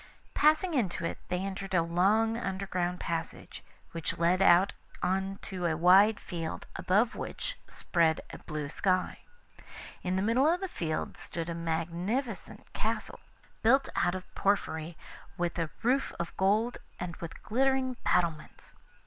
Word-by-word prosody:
Passing 310 +4 +3
into 200 - 0
it, - - -3
they 180 0 -1
entered 195 -1 -4
a 165 - +4
long 200 +7 +3
underground 190 -4 -2
passage, 165 -1 -4 0.3
which 165 -1 -3
led 175 +3 +3
out 180 +2 +6 0.3
on 190 +2 0
to 180 -3 -2
a 160 -1 0
wide 195 +5 +6
field, 165 -3 -5
above 210 +6 +2
which - - -4
spread 165 -3 +1
a - - -9
blue 150 -2 -4
sky. 185 +4 0 0.8
In 185 0 -1
the 190 - +1
middle 255 +8 +4
of 355 - +1
the 385 - -3
field 160 - -3
stood 170 0 -5
a - - -2
magnificent 170 +9 -3
castle, - - -2 0.4
built 265 +5 +4
out 175 +1 +2
of 185 - -8
porphyry, 165 -5 0 0.4
with 175 -1 -1
a 165 -2 -1
roof 260 +4 +2
of 170 0 -4
gold 215 +5 +2 0.2
and 175 -1 -4
with 170 -1 -8
glittering 260 +2 +1
battlements. 165 -4 -1
185 Hz, 145 wpm, -30 LUFS, 170-220 Hz, 0.8 s, out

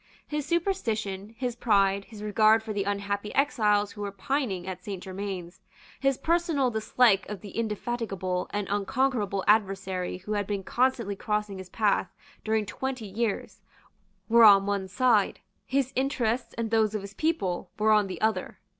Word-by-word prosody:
His 300 -1 -3
superstition, 225 - -1
his 250 -2 -2
pride, 200 -4 +2
his 215 -2 -10
regard 215 +1 +4
for 220 -1 -4
the 200 -1 -1
unhappy 200 +1 -2
exiles 210 -7 +2
who 205 - -9
were 200 -1 -3
pining 200 -2 -2
at 185 -1 -6
Saint 195 -2 -6
Germains, 190 -1 -6 0.4
his 275 -1 +2
personal 330 -6 +1
dislike 220 -2 +3
of 205 -3 -6
the 200 - -10
indefatigable 210 -5 -2
and 205 -1 -2
unconquerable 205 -1 0
adversary 195 -4 +1
who 190 +4 -5
had 205 -2 -1
been 200 -2 -2
constantly 240 -3 0
crossing 210 -2 -2
his 185 -1 -9
path 205 -3 +1 0.3
during 220 -1 +1
twenty 255 +3 -4
years, 210 +2 -3 0.7
were 235 +1 +6
on 200 -2 +8
one 200 -1 -1
side; 220 0 +2 0.3
his 270 -1 0
interests 250 -3 -1
and 225 -1 -2
those 220 -1 +2
of 210 - -2
his 200 0 -9
people 200 - -1
were 215 +1 +3
on 210 -2 +4
the 185 -3 -6
other. 220 0 0
210 Hz, 160 wpm, -27 LUFS, 195-235 Hz, 0.7 s, on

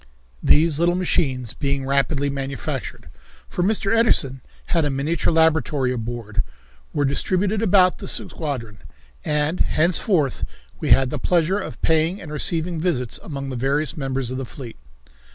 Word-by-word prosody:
These 155 -1 +4
little 175 +1 +3
machines 135 - 0
being 140 -1 -2
rapidly 140 +1 +1
manufactured, 135 -2 -5 0.4
for - - -3
Mr. 200 +2 +2
Edison 140 - +3 0.3
had 165 -2 +3
a 145 - +1
miniature 145 +6 0
laboratory 160 -5 +2
aboard, 115 -2 -3 0.5
were 145 -2 0
distributed 190 +9 0
about 185 -3 +4
the - - -7
squadron, 120 - -3 0.4
and 150 +3 0
henceforth 165 - +2 0.4
we - - -3
had 130 -1 +5
the - - -3
pleasure 180 +3 +2
of 125 - -7
paying 160 +4 +2
and 160 -4 -9
receiving 160 +2 -1
visits 130 -10 -1
among 140 -3 -6
the - - -4
various 140 +5 0
members 135 -4 -2
of 130 - -3
the - - -3
fleet. 120 -1 -9
150 Hz, 145 wpm, -22 LUFS, 135-170 Hz, 0.5 s, had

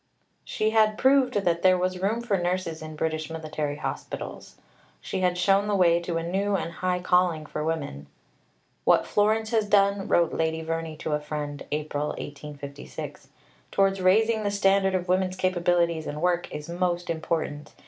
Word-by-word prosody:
She 215 0 -1
had 215 -1 +3
proved 265 -2 +4
that 175 -4 +1
there 185 -1 +5
was 185 0 -1
room 215 +5 0
for 235 -4 0
nurses 175 -3 -2
in 155 0 -7
British 155 0 -2
military 155 -2 -3
hospitals. - - -6 0.4
She - - -4
had 180 -1 +1
shown 195 +3 +3
the 205 - +1
way 170 -3 +4
to 170 -1 -2
a 165 - -2
new 195 +4 0
and 170 -2 -2
high 180 +1 -1
calling 180 -3 +2
for 150 0 -4
women. 140 - -3 0.8
"What - - +4
Florence 215 +1 +1
has 220 -2 +2
done," 200 -1 +3
wrote 170 -1 +3
Lady 160 0 -1
Verney 165 -1 -3
to 155 - -4
a 150 - +1
friend 150 -1 -5
(April 150 -1 -2
1856), 145 -1 -8 0.4
"towards 195 -1 +2
raising 220 +4 +3
the 205 - 0
standard 195 -1 +2
of 180 0 -2
women's 185 0 +1
capabilities 175 -3 +1
and 150 - -4
work 175 +1 0
is 150 0 -6
most 175 0 -1
important. 160 -2 -3
175 Hz, 170 wpm, -26 LUFS, 160-195 Hz, 0.8 s, there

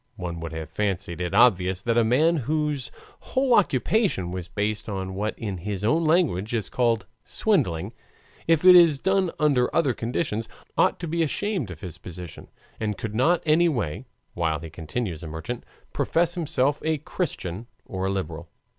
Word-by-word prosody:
One 85 -1 -5
would 80 0 -5
have 80 -1 -6
fancied 95 -2 -2
it 90 -1 -2
obvious 95 -5 +4
that 115 -1 +1
a 120 - +4
man 155 +9 +3
whose 150 -1 -1 0.3
whole 260 -1 +1
occupation 180 - +2
was 90 -1 -5
based 105 +2 -2
on 95 -2 -4
what 105 +3 -2
in 100 -5 -4
his 100 +2 -4
own 160 +10 +2
language 135 - +2
is 110 -4 -2
called 115 -5 +1 0.2
swindling, 130 - 0 0.5
if 165 +1 +3
it 185 - +11
is 170 -5 +7
done 190 +3 +1
under 140 -6 +3
other 130 - +3
conditions, 115 -1 -2 0.3
ought - - +3
to 170 - -3
be 170 +2 -1
ashamed 165 - -1
of 85 -3 -9
his 90 -3 -7
position, 90 -1 -9 0.3
and 105 -2 -2
could 110 +2 -5
not 160 +10 +2
any 165 +2 +4
way, 110 - -3 0.3
while 80 -2 0
he 80 0 -9
continues 85 +2 -4
a 85 - -7
merchant, 80 +10 -5 0.3
profess 170 +1 +1
himself 145 -5 0
a 160 0 +1
Christian 120 - -4 0.2
or 95 0 -3
a - - 0
liberal. 85 -4 -4
115 Hz, 170 wpm, -25 LUFS, -, 0.5 s, it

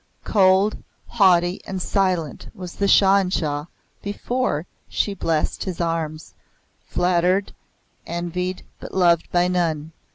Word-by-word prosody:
Cold, 195 0 +3 0.3
haughty, 180 -4 +3
and 190 -1 -3
silent 180 -5 -1
was 180 -2 -8
the 200 - 0
Shah 195 0 +6
in 190 -2 +1
Shah 150 -5 -1 0.4
before 205 -4 -2 0.2
she 205 - -1
blessed 165 -5 -1
his 185 -3 -4
arms 165 -2 -3 0.5
flattered, 180 +2 +1 0.5
envied, 180 +2 -3 0.2
but - - -9
loved 170 -3 +3
by 175 0 +3
none. 165 -4 -1
180 Hz, 120 wpm, -22 LUFS, 165-190 Hz, 0.5 s, Shah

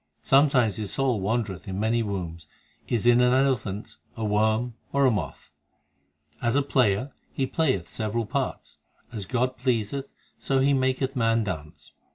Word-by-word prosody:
Sometimes 135 -7 +4
his 105 -3 -3
soul 130 -6 0
wandereth 105 -2 -2
in 95 0 -4
many 115 +2 +1
wombs 85 -7 -4 0.4
Is 120 -2 -1
in 120 0 +6
an 125 0 +4
elephant, 120 -7 0 0.2
a 110 - -2
worm, 110 +3 +1 0.2
or 140 0 +3
a 130 - +5
moth. 90 - -4 0.9
As 120 +1 +1
a 145 - +3
player 130 -2 +1 0.2
he 135 - -1
playeth 130 - 0
several 110 +1 -2
parts; - - -4 0.3
As 105 -5 -5
God 125 +1 0
please 120 -5 0
th 140 -1 -4 0.3
so 135 - 0
He 135 +2 +3
maketh 130 +1 0
man 115 -2 +2
dance. 80 -7 -7
115 Hz, 160 wpm, -26 LUFS, 105-130 Hz, 0.9 s, in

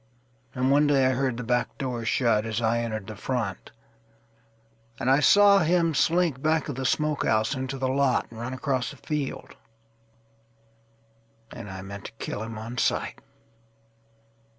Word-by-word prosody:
And 130 +1 +1
one 145 +1 +4
day 140 -2 +3
I 130 - +3
heard 130 -2 -1
the 125 - -4
back 125 +1 -1
door 125 -5 -3
shut, 110 -2 +2
As 110 -1 -2
I 115 0 +1
entered 110 -3 -3
the 110 +1 -8
front, 110 -3 -3 1.3
and 130 - +1
I 135 - +5
saw 200 +7 +6
him 165 -1 +2
slinkBack 160 -2 +1
of - - -2
the 130 0 -1
smokehouse 145 -7 +1
into 130 0 -4
the 130 0 -1
lot, 135 0 +2
And 115 - -10
run 120 +2 -4
across 130 -1 -1
the 140 - -11
field. 150 -1 -4 2.0
And 115 -4 -8
I 95 0 -7
meant 100 +1 -9
to - - -7
kill 110 - -5
him 115 0 -6
on 115 +3 -6
sight. - - -1
130 Hz, 155 wpm, -26 LUFS, 115-145 Hz, 2.0 s, saw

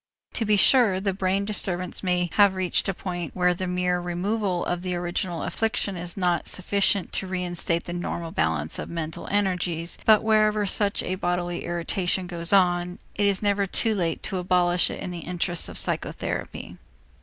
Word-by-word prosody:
To 225 - -1
be 210 0 +3
sure, 210 -3 +4
the 195 0 -1
brain 190 +1 0
disturbance 185 -3 0
may 180 -2 0
have 200 -2 +5
reached 185 +1 0
a - - 0
point 175 -3 -5
where 180 -1 +3
the 185 +1 -4
mere 180 0 0
removal 180 +1 -1
of 175 0 -2
the 180 -1 -2
original 175 -1 -2
affliction 220 -3 -1
is 175 +1 -5
not 180 -2 0
sufficient 200 0 +1
to 190 - -1
reinstate 175 -2 0
the 175 - -6
normal 170 -1 -4
balance 80 - -1
of - - -5
mental 160 -1 -5
energies, 180 -4 0
but 215 -1 +5
wherever 215 -1 +3
such 200 +1 +1
a 185 - -2
bodily 175 -1 -2
irritation 175 +2 -1
goes 170 -1 -2
on, 180 -2 +3 0.2
it 205 0 +1
is 200 0 0
never 200 -1 +2
too 225 +4 0
late 170 -5 -1
to 190 - -2
abolish 180 -1 +2
it - - -6
in 180 - -4
the 175 - -6
interests 175 0 -2
of - - -5
psychotherapy. - - -3
180 Hz, 180 wpm, -25 LUFS, 175-195 Hz, 0.2 s, have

